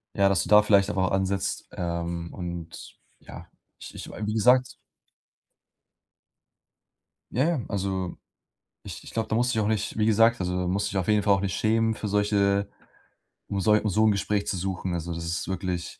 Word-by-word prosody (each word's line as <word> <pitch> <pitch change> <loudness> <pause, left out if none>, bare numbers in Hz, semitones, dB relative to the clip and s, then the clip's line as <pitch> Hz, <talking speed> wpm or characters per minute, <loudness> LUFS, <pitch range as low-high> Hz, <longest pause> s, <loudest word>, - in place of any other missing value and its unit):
Ja, 100 0 +4
dass 95 -3 +2
du - - -7
da 105 0 +7
vielleicht 100 -1 +4
einfach 95 -2 0
ansetzt, 95 0 -1
ähm, 85 -1 -4
und 85 -2 -7 0.2
ja, - - -11 0.3
ich - - -11
ich - - -8
wie 105 0 -4
gesagt 125 +3 +3 2.6
Ja, 130 - +1
ja, 170 -6 0
also 95 -2 -3 0.7
ich - - -9
ich - - -10
glaube, 115 -1 -2
da 110 - 0
musst 125 +1 +2
du - - -2
dich 110 - +2
auch 105 - 0
nicht 110 0 -2
wie 110 - +2
gesagt, 115 -1 +4
also 90 0 -1
da 90 - -2
musst 95 +3 0
du - - -4
dich 95 - -3
auf 90 - -1
jeden 105 -1 +3
Fall 100 - +4
auch 100 - +2
nicht 95 -3 -2
schämen 110 +1 +1
für 105 - -4
solche, 100 -1 +1 0.8
um 100 - -2
sol 105 +2 +4
um 105 - 0
so 110 +4 +3
'n 110 - +5
Gespräch 100 0 -1
zu - - -1
suchen. 95 0 -3
Also, 85 0 -3
das 85 0 -5
ist 85 +2 -3
wirklich, 90 -2 -4
100 Hz, 200 wpm, -26 LUFS, 90-105 Hz, 2.6 s, da